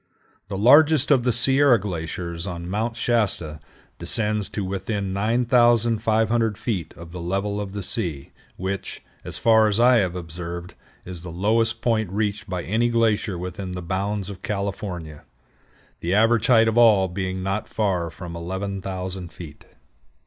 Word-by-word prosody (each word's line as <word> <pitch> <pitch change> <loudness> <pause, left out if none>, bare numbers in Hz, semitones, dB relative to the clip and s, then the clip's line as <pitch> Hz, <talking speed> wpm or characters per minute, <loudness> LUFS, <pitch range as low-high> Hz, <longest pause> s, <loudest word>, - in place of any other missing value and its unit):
The 100 -1 -4
largest 145 +6 +5
of 135 -3 +5
the 125 +1 +1
Sierra 130 +1 +4
glaciers 85 -1 -4
on 85 -1 -5
Mount 110 +5 -2
Shasta 105 -11 0 0.4
descends 105 -2 -1
to 100 - -4
within 100 0 -3
9500 115 0 +2
feet 90 -9 -3
of 85 0 -11
the 90 0 -7
level 100 +4 -2
of 100 -1 -6
the 100 -1 -4
sea, 85 -9 -4 0.3
which, 95 +1 -5 0.2
as - - -6
far 110 -1 +5
as 105 +1 +1
I 125 +1 +6
have 90 -5 0
observed, 85 +1 -6 0.3
is 90 -2 -8
the 90 - -8
lowest 110 +6 0
point 110 -4 +1
reached 105 0 -2
by 90 -2 -3
any 115 +5 +1
glacier 110 -4 +1
within 90 +1 -6
the 90 -1 -5
bounds 100 +3 -2
of 95 -2 -11
California, 95 -7 -4 0.8
the 90 +3 -1
average 115 +1 +3
height 115 -3 +5
of 115 +1 +2
all 105 -5 +6
being 95 0 -4
not 95 +3 -2
far 95 -6 -1
from 85 +1 -9
11,000 95 0 -5
feet. 75 -4 -11
100 Hz, 150 wpm, -23 LUFS, 90-115 Hz, 0.8 s, I